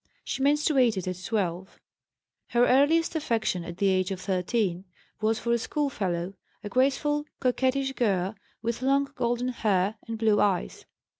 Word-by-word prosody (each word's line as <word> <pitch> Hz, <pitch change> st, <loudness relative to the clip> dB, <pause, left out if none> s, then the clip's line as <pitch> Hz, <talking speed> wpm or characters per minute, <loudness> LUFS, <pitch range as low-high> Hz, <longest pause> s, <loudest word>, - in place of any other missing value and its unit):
She -, -, -4 dB
menstruated 265 Hz, -, +2 dB
at 185 Hz, 0 st, -4 dB
12. 190 Hz, -3 st, -2 dB, 0.7 s
Her 240 Hz, 0 st, +3 dB
earliest 295 Hz, +7 st, +3 dB
affection, 225 Hz, -, 0 dB
at 170 Hz, 0 st, -8 dB
the 200 Hz, 0 st, +2 dB
age 185 Hz, -1 st, +1 dB
of 190 Hz, -2 st, -4 dB
13, 185 Hz, 0 st, -1 dB, 0.4 s
was 220 Hz, +1 st, +2 dB
for 235 Hz, +2 st, -2 dB
a 235 Hz, -, +3 dB
schoolfellow, 195 Hz, -, -2 dB, 0.3 s
a 205 Hz, -, -5 dB
graceful, 285 Hz, +4 st, +1 dB
coquettish 260 Hz, +1 st, +1 dB
girl 195 Hz, -6 st, 0 dB, 0.3 s
with 235 Hz, +1 st, -2 dB
long 275 Hz, +1 st, +2 dB
golden 245 Hz, 0 st, -1 dB
hair 210 Hz, -3 st, 0 dB
and 225 Hz, 0 st, -4 dB
blue 220 Hz, -2 st, +3 dB
eyes. 195 Hz, -, 0 dB
225 Hz, 145 wpm, -27 LUFS, 190-265 Hz, 0.7 s, Her